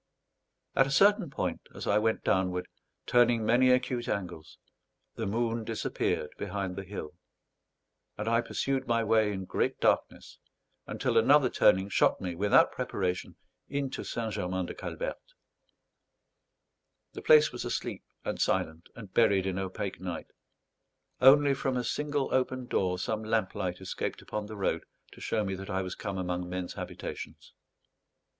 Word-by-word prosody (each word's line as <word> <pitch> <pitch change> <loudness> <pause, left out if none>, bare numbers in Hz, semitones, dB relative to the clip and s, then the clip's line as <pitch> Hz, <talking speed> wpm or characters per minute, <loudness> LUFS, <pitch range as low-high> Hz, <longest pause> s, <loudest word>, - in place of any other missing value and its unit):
At 135 - +5
a - - -4
certain 200 +3 +4
point, 95 -10 -3
as - - -6
I 105 - +3
went 110 +1 0
downward, 90 -1 +1 0.4
turning 120 -2 +3
many 125 +3 +4
acute 125 -1 +1
angles, 90 -6 -4 0.6
the - - -3
moon 115 +2 -1
disappeared 110 -8 -2
behind 95 -2 -3
the 100 - -5
hill; 95 -5 -7 1.0
and 105 - -4
I 115 +1 +3
pursued 135 +2 -2
my 115 -1 +2
way 110 -1 +3
in 95 -2 -4
great - - -1
darkness, - - 0 0.5
until - - +1
another 135 +2 +5
turning 95 -1 +4
shot 100 - +2
me 90 -2 -3
without 100 +4 +4
preparation 90 -2 -3 0.3
into 140 -2 -3
St. 115 -2 -3
Germain 95 -2 -2
de - - -6
Calberte. - - -6 1.8
The - - -7
place 155 0 +6
was 120 - -5
asleep - - -3 0.2
and - - -2
silent, 80 +2 -1
and 105 -5 -11
buried 100 -5 +4
in 95 0 -1
opaque 95 0 -4
night. 90 -3 -5 0.9
Only 140 +2 +7
from 135 -1 -1
a 125 - -1
single 145 +2 -1
open 130 0 0
door, 90 -6 0
some 110 +4 -2
lamplight 95 -5 -1
escaped 95 0 -4
upon 105 -1 -4
the 110 0 -8
road 95 - 0 0.3
to - - -14
show 110 -2 0
me 95 - -2
that 95 +1 -8
I 95 0 -1
was 90 0 -5
come 100 -2 -5
among 90 -1 -3
men's 90 0 -4
habitations. - - -7
105 Hz, 150 wpm, -29 LUFS, 95-125 Hz, 1.8 s, Only